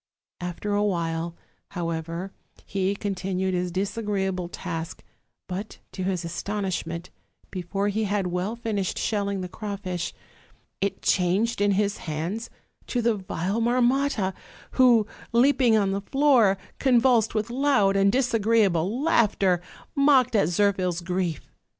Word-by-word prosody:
After 180 +4 -3
awhile, 170 -5 -1 0.4
however, 170 +2 -3 0.3
he 195 0 -1
continued 190 -2 -2
his 180 0 -1
disagreeable 195 -2 -2
task; 165 -3 -5 0.4
but, 195 +4 -6
to 190 - -6
his 185 -3 -1
astonishment, 175 -1 -3 0.4
before 195 +2 -2
he 215 +2 0
had 200 -1 0
well 180 +5 -2
fin 230 -3 -3
ished 190 -2 -1
shelling 200 -2 -1
the 180 - -4
crawfish, 190 -3 -4 0.7
it 195 0 -2
changed 195 +5 +2
in 205 0 +3
his 200 +1 +1
hands 170 +9 -3 0.4
to 245 -2 -1
the 235 0 +3
vile 195 +1 -2
Marmotta; 245 -3 +2 0.4
who, 245 -4 +5 0.3
leaping 250 -2 +4
on 200 -2 +2
the 195 +1 -1
floor, 250 -5 +4 0.2
convulsed 245 -4 +3
with 215 +2 -1
loud 245 -7 +3
and 195 0 +4
disagreeable 225 - +2
laughter, 200 - +3 0.3
mocked 275 -4 +4
at 200 -7 +4
Zirphil's 180 -1 +1
grief. 180 -2 -3
200 Hz, 125 wpm, -25 LUFS, 180-225 Hz, 0.7 s, who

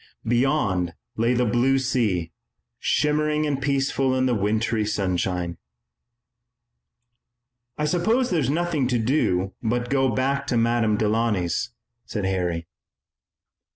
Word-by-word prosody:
Beyond 115 - +1 0.2
lay 115 +3 +1
the 125 +1 +2
blue 120 +5 +2
sea, 110 -11 0 0.5
shimmering 150 +1 +1
and 140 -2 -1
peaceful 135 -1 +1
in 130 0 +1
the 125 - +2
wintry 110 +1 0
sunshine. 90 -4 -1 2.2
"I 150 - 0
suppose 220 +11 +1
there 175 - +2
is 135 -4 0
nothing 155 -3 0
to 125 -1 +1
do 105 -6 +1
but 120 +2 -1
go 135 -1 +3
back 135 +4 0
to 120 - +1
Madame 115 -2 +2
Delaunay's," 105 -5 0 0.3
said 105 -3 -4
Harry. 90 -3 -1
120 Hz, 120 wpm, -24 LUFS, 105-135 Hz, 2.2 s, go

